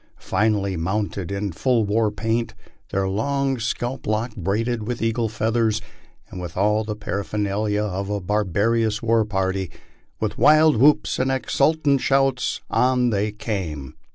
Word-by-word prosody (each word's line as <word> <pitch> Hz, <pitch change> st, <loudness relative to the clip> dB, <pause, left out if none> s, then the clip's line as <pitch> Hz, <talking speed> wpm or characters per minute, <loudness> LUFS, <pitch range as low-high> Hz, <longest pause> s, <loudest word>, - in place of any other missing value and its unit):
Finely 100 Hz, -1 st, 0 dB
mounted, 95 Hz, +2 st, -2 dB
in 100 Hz, 0 st, -2 dB
full 115 Hz, +5 st, +1 dB
war 110 Hz, +2 st, +2 dB
paint, 115 Hz, +2 st, -2 dB, 0.3 s
their 95 Hz, 0 st, 0 dB
long 135 Hz, +6 st, 0 dB
scalp 120 Hz, +3 st, -3 dB
locks 110 Hz, +2 st, -1 dB
braided 110 Hz, +5 st, -1 dB
with 120 Hz, -1 st, -3 dB
eagles' 115 Hz, -1 st, -1 dB
feathers, 110 Hz, 0 st, +1 dB, 0.5 s
and 90 Hz, -, -6 dB
with 85 Hz, -1 st, -7 dB
all 105 Hz, +3 st, +2 dB
the 105 Hz, -1 st, -4 dB
paraphernalia 105 Hz, 0 st, -2 dB
of 100 Hz, -1 st, -3 dB
a 105 Hz, 0 st, -1 dB
barbar 105 Hz, +2 st, 0 dB
ous 110 Hz, -1 st, 0 dB
war 115 Hz, -1 st, +3 dB
party 95 Hz, -2 st, -1 dB, 0.5 s
with -, -, -3 dB
wild 155 Hz, -2 st, +6 dB
whoops 145 Hz, +5 st, +3 dB
and 130 Hz, +1 st, +1 dB
exultant 140 Hz, +1 st, +1 dB
shouts, 135 Hz, -1 st, +1 dB
on 125 Hz, -1 st, +2 dB
they 105 Hz, 0 st, 0 dB
came. 85 Hz, -, -5 dB
110 Hz, 145 wpm, -22 LUFS, 100-120 Hz, 0.5 s, wild